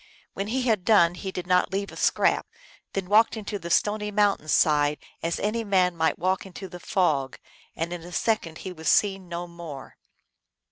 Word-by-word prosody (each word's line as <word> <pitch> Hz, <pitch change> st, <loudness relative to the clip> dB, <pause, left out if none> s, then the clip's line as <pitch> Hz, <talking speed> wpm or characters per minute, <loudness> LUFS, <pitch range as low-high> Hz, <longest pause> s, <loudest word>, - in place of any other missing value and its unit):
When 195 Hz, +1 st, -3 dB
he 255 Hz, +4 st, -1 dB
had 220 Hz, -7 st, +1 dB
done 175 Hz, -5 st, +5 dB
he 190 Hz, +2 st, -6 dB
did 180 Hz, -1 st, -5 dB
not 180 Hz, 0 st, +2 dB
leave 200 Hz, +1 st, -2 dB
a -, -, -11 dB
scrap; -, -, +2 dB, 0.5 s
then 195 Hz, -2 st, -3 dB
walked 220 Hz, +3 st, +4 dB
into 205 Hz, -1 st, -4 dB
the 170 Hz, -, -7 dB
stony 210 Hz, +3 st, +1 dB
mountain 205 Hz, -6 st, +1 dB
side, 150 Hz, -1 st, +3 dB, 0.2 s
as 170 Hz, +1 st, -2 dB
any 220 Hz, +3 st, -1 dB
man 185 Hz, -4 st, +2 dB
might 160 Hz, -1 st, +1 dB
walk 185 Hz, +2 st, 0 dB
into 190 Hz, 0 st, -9 dB
the 180 Hz, 0 st, -10 dB
fog, 155 Hz, -9 st, 0 dB, 0.4 s
and 170 Hz, +2 st, -3 dB
in 175 Hz, -, -6 dB
a 175 Hz, +2 st, -11 dB
second 175 Hz, -5 st, -1 dB
he 185 Hz, -, -4 dB
was 160 Hz, -2 st, -2 dB
seen 195 Hz, -3 st, +2 dB
no 175 Hz, 0 st, -4 dB
more. 170 Hz, -5 st, -10 dB
180 Hz, 190 wpm, -26 LUFS, 170-205 Hz, 0.5 s, done